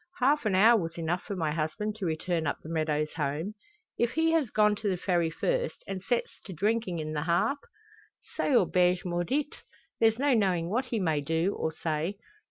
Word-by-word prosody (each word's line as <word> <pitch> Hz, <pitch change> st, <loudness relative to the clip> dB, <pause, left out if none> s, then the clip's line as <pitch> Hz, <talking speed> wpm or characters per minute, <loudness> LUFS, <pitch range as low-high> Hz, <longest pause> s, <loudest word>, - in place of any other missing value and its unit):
Half 275 Hz, -1 st, +3 dB
an 195 Hz, -, +1 dB
hour 220 Hz, +4 st, +6 dB
was 165 Hz, 0 st, -5 dB
enough 170 Hz, +2 st, -1 dB
for 205 Hz, -, -5 dB
my 160 Hz, -4 st, -1 dB
husband 165 Hz, +8 st, -2 dB
to 195 Hz, -5 st, -2 dB
return 165 Hz, 0 st, -1 dB
up -, -, -1 dB
the 155 Hz, -, -9 dB
meadows 155 Hz, -2 st, -1 dB
home. 155 Hz, +6 st, -2 dB, 0.5 s
If 235 Hz, 0 st, +1 dB
he 325 Hz, 0 st, +2 dB
has 320 Hz, -7 st, +2 dB
gone 210 Hz, -1 st, +3 dB
to 210 Hz, -, -1 dB
the 185 Hz, -, 0 dB
Ferry 175 Hz, -2 st, +1 dB
first, -, -, -2 dB
and 195 Hz, -1 st, -5 dB
sets 240 Hz, +5 st, -2 dB
to 190 Hz, -, -7 dB
drinking 205 Hz, 0 st, 0 dB
in 155 Hz, -1 st, -4 dB
the 150 Hz, -, -1 dB
Harp? 175 Hz, -, +1 dB, 0.8 s
Cette 280 Hz, -, +1 dB
auberge 180 Hz, -5 st, +3 dB
maudit. 180 Hz, -, -2 dB, 0.4 s
There's 225 Hz, 0 st, +4 dB
no 280 Hz, +1 st, +2 dB
knowing 185 Hz, -6 st, +1 dB
what 250 Hz, +5 st, 0 dB
he 235 Hz, -3 st, -2 dB
may 160 Hz, -6 st, +1 dB
do, 165 Hz, +6 st, 0 dB
or 160 Hz, -, -2 dB
say. 160 Hz, +4 st, -2 dB
185 Hz, 195 wpm, -29 LUFS, 160-225 Hz, 0.8 s, hour